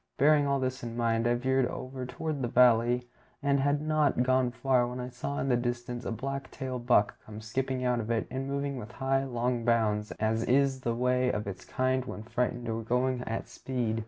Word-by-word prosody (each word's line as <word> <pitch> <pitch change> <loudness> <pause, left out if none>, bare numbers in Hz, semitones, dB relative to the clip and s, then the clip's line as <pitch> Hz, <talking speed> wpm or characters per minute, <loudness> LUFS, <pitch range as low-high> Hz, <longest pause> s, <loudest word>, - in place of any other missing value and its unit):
Bearing 145 0 +5
all 140 0 +1
this 130 0 -2
in 120 -1 -6
mind, 115 -1 +1
I 120 - +3
veered 130 +1 +2
over 130 0 -6
toward 145 +3 -3
the 120 - 0
valley, 120 0 +4 0.4
and 140 -1 +3
had 145 +2 +1
not 155 -5 +2
gone 130 0 +3
far 125 0 +2
when 125 +1 -5
I 125 0 -4
saw 125 +3 -4
in - - -1
the 125 - +3
distance 120 0 -3
a - - -2
black 135 +4 -4
tail 130 -1 -4
buck 120 -4 +2
come 110 0 -9
skipping 130 +3 -2
out 125 -1 +2
of 110 -1 -4
it, 115 -1 +1
and 135 +1 -3
moving 140 0 -2
with 120 0 -8
high, 135 0 +1
long 120 -1 -1
bounds, 110 -3 +2
as 110 +1 0
is 135 0 +2
the 120 -2 -1
way 125 +1 +2
of 105 - -3
its 100 -2 -7
kind 130 0 0
when 105 - -6
frightened 120 +1 -2
or 115 0 -2
going 125 +2 0
at 115 - -3
speed. 120 -4 -2
125 Hz, 215 wpm, -29 LUFS, 120-130 Hz, 0.4 s, Bearing